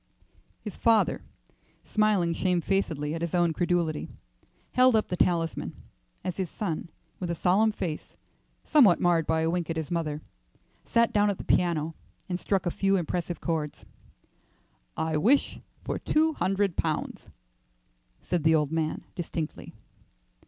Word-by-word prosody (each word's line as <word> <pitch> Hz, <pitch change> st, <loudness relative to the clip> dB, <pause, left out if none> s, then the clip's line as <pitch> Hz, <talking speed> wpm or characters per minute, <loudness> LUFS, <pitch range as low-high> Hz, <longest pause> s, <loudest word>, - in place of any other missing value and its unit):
His 210 Hz, -, -7 dB
father, 225 Hz, -2 st, +3 dB, 0.6 s
smiling 210 Hz, -6 st, +2 dB
shamefacedly 170 Hz, -4 st, 0 dB
at 165 Hz, -, -4 dB
his 170 Hz, 0 st, -2 dB
own 175 Hz, -2 st, +3 dB
credulity, 170 Hz, -2 st, 0 dB, 0.6 s
held 255 Hz, -1 st, +5 dB
up 215 Hz, -, +1 dB
the 180 Hz, -, -1 dB
talisman, 170 Hz, -2 st, 0 dB, 0.5 s
as 185 Hz, -, -3 dB
his 190 Hz, -3 st, -2 dB
son, 170 Hz, -5 st, -4 dB, 0.3 s
with 180 Hz, -, -3 dB
a 170 Hz, -, -1 dB
solemn 200 Hz, +7 st, +3 dB
face, 165 Hz, -7 st, -5 dB, 0.5 s
somewhat 245 Hz, -, +5 dB
marred 170 Hz, -3 st, +2 dB
by 160 Hz, 0 st, +2 dB
a 160 Hz, -, +1 dB
wink 175 Hz, -1 st, -2 dB
at 165 Hz, -, -1 dB
his 160 Hz, +1 st, -4 dB
mother, 155 Hz, -3 st, -2 dB, 0.6 s
sat 235 Hz, +1 st, +2 dB
down 205 Hz, -1 st, +4 dB
at 200 Hz, -, -1 dB
the -, -, -7 dB
piano 165 Hz, -3 st, +1 dB, 0.3 s
and 180 Hz, -1 st, -2 dB
struck 195 Hz, -1 st, 0 dB
a 175 Hz, -, 0 dB
few 195 Hz, +2 st, +1 dB
impressive 175 Hz, 0 st, -3 dB
chords. 155 Hz, -3 st, -3 dB, 1.1 s
"I 160 Hz, -1 st, 0 dB
wish 250 Hz, -, +2 dB, 0.2 s
for -, -, -3 dB
two 315 Hz, +1 st, +2 dB
hundred 195 Hz, -, 0 dB
pounds," 155 Hz, -2 st, -2 dB, 1.0 s
said 175 Hz, -4 st, -1 dB
the 160 Hz, 0 st, +5 dB
old 150 Hz, -2 st, +1 dB
man 160 Hz, -1 st, -1 dB
distinctly. 165 Hz, -3 st, -5 dB
175 Hz, 145 wpm, -27 LUFS, 160-195 Hz, 1.1 s, held